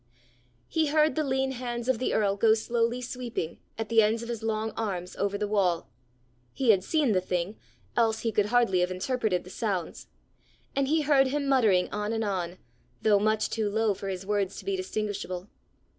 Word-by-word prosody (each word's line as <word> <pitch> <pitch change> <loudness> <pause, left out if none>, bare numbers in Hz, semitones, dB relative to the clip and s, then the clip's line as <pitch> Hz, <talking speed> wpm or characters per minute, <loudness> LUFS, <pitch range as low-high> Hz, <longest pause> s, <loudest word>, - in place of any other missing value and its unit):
He 320 -2 +1
heard 305 +1 +3
the 310 - 0
lean 265 -1 0
hands 240 -2 -4
of 260 -3 +2
the 255 - 0
earl 200 -2 +2
go 220 +2 +4
slowly 235 +2 0
sweeping, 240 -9 -4 0.2
at 225 -1 -4
the 230 -1 +6
ends 220 +2 +1
of 235 - -7
his 230 -2 -3
long 220 0 -1
arms, 190 -5 -4
over 200 0 -1
the 210 0 -1
wall: 185 -5 +1 0.7
he 255 -4 +4
had 190 -3 +2
seen 300 0 +2
the 185 -3 +2
thing, 180 +2 -2 0.4
else 225 -2 +2
he 225 - 0
could 210 -1 +2
hardly 235 -5 +3
have 180 0 +2
interpreted 185 -1 -1
the 185 - -12
sounds; 195 -7 -3 0.7
and 275 -1 +1
he 315 +2 +2
heard 280 -2 +4
him 285 +1 -1
muttering 220 -10 +4
on 210 +1 -2
and 225 0 -1
on, 185 -3 -2 0.5
though 210 -2 +5
much 215 +1 +1
too 220 -2 0
low 220 0 +1
for 195 +1 -7
his 190 -1 -4
words 200 -1 0
to - - -9
be 395 -1 0
distinguishable. 210 - -3
220 Hz, 195 wpm, -28 LUFS, 195-245 Hz, 0.7 s, the